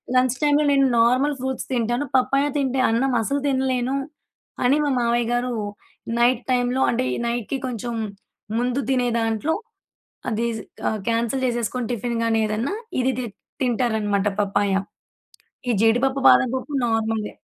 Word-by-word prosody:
లంచ్‌టైమ్‌లో 285 Hz, +4 st, +3 dB
నేను 275 Hz, -1 st, +4 dB
normal 255 Hz, +5 st, +3 dB
fruits 265 Hz, 0 st, -3 dB
తింటాను. 240 Hz, +3 st, 0 dB
Papaya 275 Hz, +2 st, +2 dB
తింటే 265 Hz, -1 st, 0 dB
అన్నం 255 Hz, +4 st, +1 dB
అసలు 280 Hz, +5 st, -1 dB
తినలేను 260 Hz, -1 st, 0 dB, 0.7 s
అని 255 Hz, +4 st, +4 dB
మా 285 Hz, -, +1 dB
మావయ్య 235 Hz, 0 st, +1 dB
గారు 245 Hz, +1 st, 0 dB, 0.7 s
నైట్ 240 Hz, 0 st, +3 dB
టైమ్‌లో 250 Hz, +1 st, +1 dB
అంటే 250 Hz, +2 st, 0 dB
ఈ -, -, -1 dB
నైట్‌కి 240 Hz, +3 st, -2 dB
కొంచెం 240 Hz, 0 st, -4 dB, 0.6 s
ముందు 245 Hz, +2 st, 0 dB
తినే 250 Hz, -2 st, +2 dB
దాంట్లో 225 Hz, +7 st, 0 dB, 0.8 s
అది 230 Hz, +1 st, 0 dB
స్ -, -, -6 dB, 0.3 s
ఆహ్, 215 Hz, -, -3 dB
కాన్సెల్ 235 Hz, +3 st, 0 dB
చేసేసుకొని 240 Hz, 0 st, -2 dB
టిఫిన్‌ 235 Hz, +1 st, -2 dB
గాని 225 Hz, -1 st, +2 dB
ఏదన్నా 220 Hz, -, -2 dB, 0.3 s
ఇది 260 Hz, +1 st, +2 dB
తి 245 Hz, -, -3 dB, 0.4 s
తింటారనమాట 220 Hz, -5 st, +1 dB
పప్పాయ. 200 Hz, 0 st, +1 dB, 1.0 s
ఈ -, -, +4 dB
జీడిపప్పు 255 Hz, +4 st, +3 dB
బాదం 255 Hz, -, +4 dB
పప్పు 275 Hz, +3 st, -6 dB
నార్మలే. 225 Hz, -1 st, -1 dB
245 Hz, 135 wpm, -23 LUFS, 230-265 Hz, 1.0 s, నేను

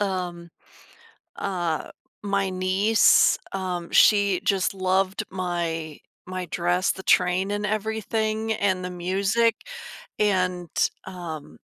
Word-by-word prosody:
um, 180 Hz, -3 st, -3 dB, 0.9 s
uh, 175 Hz, -5 st, -2 dB, 0.3 s
my 200 Hz, -1 st, 0 dB
niece, 190 Hz, +4 st, +4 dB, 0.2 s
um, 180 Hz, -3 st, -3 dB
she 200 Hz, -3 st, +5 dB
just 195 Hz, -2 st, +1 dB
loved 190 Hz, 0 st, 0 dB
my 170 Hz, -4 st, -3 dB, 0.3 s
my 185 Hz, -1 st, -4 dB
dress, 175 Hz, +2 st, +1 dB
the 190 Hz, -, -8 dB
train 185 Hz, +2 st, +2 dB
and 205 Hz, 0 st, -2 dB
everything, 220 Hz, +1 st, -1 dB
and 190 Hz, -3 st, 0 dB
the 180 Hz, -, -4 dB
music, 195 Hz, +6 st, +1 dB, 0.6 s
and, 185 Hz, -4 st, +1 dB, 0.4 s
um, 160 Hz, -, -8 dB
185 Hz, 100 wpm, -24 LUFS, 180-200 Hz, 0.9 s, she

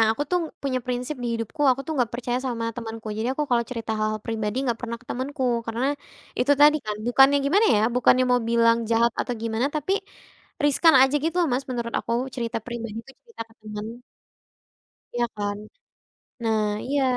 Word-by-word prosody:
nah 225 Hz, -, +6 dB
aku 285 Hz, -, -2 dB
tuh 360 Hz, -, +3 dB, 0.2 s
punya 265 Hz, -2 st, 0 dB
prinsip 250 Hz, +3 st, -3 dB
di -, -, -1 dB
hidupku 230 Hz, +7 st, -4 dB
aku 260 Hz, +1 st, +1 dB
tuh 320 Hz, -, -2 dB
gak 230 Hz, -, -3 dB
percaya 245 Hz, 0 st, -1 dB
sama 230 Hz, -2 st, -2 dB
temanku. 225 Hz, -1 st, -7 dB
Jadi 225 Hz, +3 st, -1 dB
aku 300 Hz, -, -2 dB
kalau 235 Hz, -1 st, +3 dB
cerita 230 Hz, -3 st, -4 dB
hal-hal 215 Hz, 0 st, -1 dB
pribadi 220 Hz, -1 st, -2 dB
gak 230 Hz, -, -3 dB
pernah 235 Hz, -1 st, -4 dB
ke 255 Hz, -, -23 dB
temanku 265 Hz, +3 st, -3 dB, 0.2 s
karena, 230 Hz, +2 st, -3 dB, 0.6 s
itu 280 Hz, +4 st, +4 dB
tadi 300 Hz, +1 st, +7 dB
kan 210 Hz, -1 st, -2 dB
bukannya 270 Hz, +3 st, +6 dB
gimana 400 Hz, +10 st, +4 dB
ya 210 Hz, -, +3 dB, 0.2 s
bukannya 255 Hz, +1 st, +4 dB
mau 245 Hz, -, +4 dB
bilang 230 Hz, 0 st, +4 dB
jahat 230 Hz, 0 st, +3 dB
atau 245 Hz, -, -2 dB
gimana 230 Hz, +3 st, 0 dB
tapi, 305 Hz, +6 st, -1 dB, 0.7 s
riskan 305 Hz, +2 st, +5 dB
aja 265 Hz, +2 st, +3 dB
gitu 330 Hz, +2 st, -1 dB
loh 340 Hz, -, +2 dB
Mas, 260 Hz, +2 st, 0 dB
menurut 235 Hz, -2 st, -3 dB
aku 230 Hz, -, -4 dB, 0.2 s
cerita 235 Hz, -3 st, -3 dB
pribadiku 230 Hz, 0 st, -6 dB
cerita 465 Hz, -, -8 dB
ke 225 Hz, -, -22 dB
temen. 210 Hz, 0 st, -6 dB, 1.3 s
Iya 240 Hz, 0 st, +1 dB
kan, 205 Hz, 0 st, -2 dB, 0.8 s
nah 220 Hz, -2 st, +1 dB, 0.2 s
iya. 280 Hz, 0 st, +1 dB
240 Hz, 185 wpm, -24 LUFS, 225-270 Hz, 1.3 s, tadi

